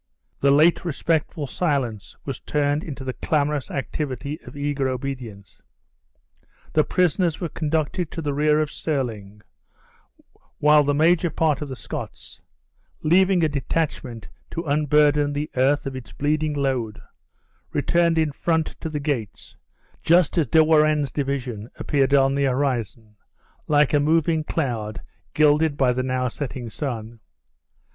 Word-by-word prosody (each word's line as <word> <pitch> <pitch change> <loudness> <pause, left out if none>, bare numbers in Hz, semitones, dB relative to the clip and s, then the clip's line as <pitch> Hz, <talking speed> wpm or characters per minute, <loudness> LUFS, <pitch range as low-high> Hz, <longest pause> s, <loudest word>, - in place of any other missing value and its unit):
The 140 - +3
late 155 +7 +4
respectful 160 -2 -1
silence 135 - -2
was 135 -2 -4
turned 145 +1 0
into 140 -4 -7
the 130 -1 -3
clamorous 150 -2 -1
activity 140 +2 -4
of - - -12
eager 140 -2 -1
obedience. 125 -7 -6 1.1
The 155 - +4
prisoners 175 -1 +1
were 170 - -3
conducted 160 +2 -1
to - - -7
the 145 -1 -1
rear 150 +1 +3
of 155 -1 -2
Stirling; 110 -11 -4 1.1
while 150 0 +5
the 145 0 +1
major 170 +3 +3
part 155 -3 0
of 150 - -4
the 130 - -5
Scots - - -8 0.6
(leaving 185 +2 +4
a - - +4
detachment 140 -5 -3 0.2
to 165 - -4
unburden 150 -1 +2
the 150 +2 -3
earth 135 +3 +2
of 135 -1 -4
its 115 -6 -9
bleeding 150 +1 0
load), 130 -6 -1 0.7
returned 170 -1 +2
in 160 -2 +2
front 160 +2 0 0.2
to 160 - -3
the 150 -1 -3
gates, 140 -9 -4 0.5
just 170 -1 +3
as 165 -6 +2
De 160 +7 +5
Warenne's 155 -3 +3
division 130 -6 -3
appeared 140 -1 +1
on 135 0 +4
the 140 0 +1
horizon, 120 -5 -2 0.5
like 150 -1 +3
a 145 - +5
moving 160 +1 +2
cloud 115 -10 -3 0.3
gilded 150 0 +3
by 130 -2 +3
the 130 - -1
now 130 0 -1
setting 125 -2 -5
sun. 115 -5 -5
145 Hz, 140 wpm, -23 LUFS, 130-155 Hz, 1.1 s, while